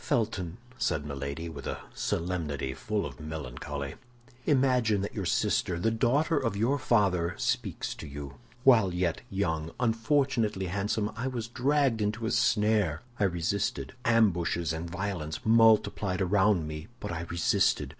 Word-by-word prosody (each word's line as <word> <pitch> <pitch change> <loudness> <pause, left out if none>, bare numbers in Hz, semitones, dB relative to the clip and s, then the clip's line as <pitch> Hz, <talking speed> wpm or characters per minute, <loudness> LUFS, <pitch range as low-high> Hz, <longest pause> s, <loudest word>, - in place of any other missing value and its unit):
"Felton," 100 -6 -1 0.2
said 80 -9 0
Milady, 70 +3 -4
with 75 -4 -7
a - - -2 0.2
solemnity 80 -6 -2
full 105 +7 -2
of 65 -4 -8
melancholy, 70 -2 -5 0.5
"imagine 125 -7 +3
that 100 - -4
your - - -3
sister, 85 - +1
the 115 +6 +1
daughter 140 +8 +2
of 115 -6 -1
your 125 +7 +1
father, 95 -8 +2
speaks 120 - -1
to 80 - -9
you. 70 -1 -8 0.3
While 110 -10 +5
yet 90 -4 0
young, 80 -5 -1
unfortunately 115 -3 +1
handsome, 105 +3 -1
I 125 +3 -3
was 120 -4 -3
dragged 130 -1 +1
into 105 +2 -1
a 110 - 0
snare. 105 -8 +2 0.2
I 105 - +4
resisted. 95 +8 -1
Ambushes 90 -7 +2
and 80 +1 -4
violences 90 -4 -3
multiplied 110 -4 +4
around 95 -3 +3
me, 75 0 -6
but 105 - -5
I 85 -1 -3
resisted. 85 0 +2
100 Hz, 145 wpm, -29 LUFS, 80-115 Hz, 0.5 s, While